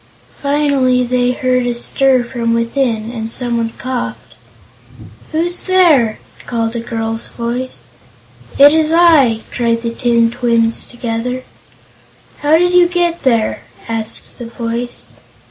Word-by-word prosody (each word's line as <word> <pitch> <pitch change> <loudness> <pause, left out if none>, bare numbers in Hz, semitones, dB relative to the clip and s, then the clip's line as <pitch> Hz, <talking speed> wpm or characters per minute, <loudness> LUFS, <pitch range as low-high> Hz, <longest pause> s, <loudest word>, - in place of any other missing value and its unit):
Finally 280 -3 +2
they 245 0 +1
heard 255 -1 0
a 240 - -1
stir 260 +1 +2
from 235 -1 -2
within 230 -1 -1
and 225 -2 -5
someone 235 -2 -2
coughed. 115 - -5 1.0
"Who's 345 +3 -1
there?" 325 - +3 0.3
called 230 -1 -2
a - - -1
girl's 225 -1 -4
voice. 245 +2 -5 0.7
"It's 305 +3 +5
I!" 315 -10 +4
cried 230 -1 0
the 230 0 -2
tin 235 -1 +2
twins, 235 -2 0
together. 240 +1 -4 1.0
"How 300 +2 +3
did 355 +1 +2
you 355 -1 +6
get 345 -1 -1
there?" 230 -5 +1 0.3
asked 225 +1 -4
the 240 - -6
voice. 235 +1 -5
245 Hz, 120 wpm, -15 LUFS, 230-280 Hz, 1.0 s, you